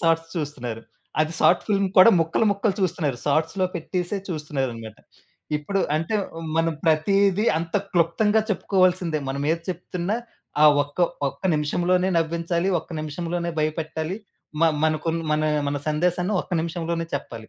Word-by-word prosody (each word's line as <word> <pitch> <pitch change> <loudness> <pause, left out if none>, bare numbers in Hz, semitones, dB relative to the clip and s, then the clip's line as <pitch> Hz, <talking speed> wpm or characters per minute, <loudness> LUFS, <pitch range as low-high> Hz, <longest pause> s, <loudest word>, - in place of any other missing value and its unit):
SATS 165 0 +1
చూస్తున్నారు. 130 -8 -4 0.4
అది 155 +1 +1
సాట్ 175 - +5
film 200 -2 +2
కూడా 185 +5 +9
ముక్కలు, 165 +6 +1
ముక్కలు 200 0 0
చూస్తన్నారు. 160 -9 0
సాట్స్‌లో 160 +6 +1
పెట్టేసే 180 +3 -2
చూస్తన్నారనమాట. 135 - -4 0.6
ఇప్పుడు 195 +7 -2 0.2
అంటే, 165 +7 -2 0.4
మనం 165 0 +2
ప్రతీది 195 +6 +3
అంత 165 0 -2 0.2
క్లుప్తంగా 205 +6 +3
చెప్పుకోవాల్సిందే 185 -5 +2
మనమేది 145 +5 -1
చెప్తున్నా, 180 +3 -3 0.5
ఆ - - +8 0.2
ఒక్క 145 +2 -12 0.3
ఒక్క 140 - -12
నిమిషంలోనే 175 +5 +1
నవ్వించాలి, 170 +2 -1
ఒక్క - - -21
నిమిషంలోనే 170 +3 -3
భయపెట్టాలి. 155 +2 -2 0.4
మ - - +3 0.2
మనకున్న 160 +1 0
మనా 155 0 +1 0.2
మన 145 - -1
సందేశాన్ని 180 +5 0
ఒక్క - - -15
నిమిషంలోనే 165 0 -3
చెప్పాలి. 135 -4 -5
165 Hz, 125 wpm, -24 LUFS, 155-180 Hz, 0.6 s, కూడా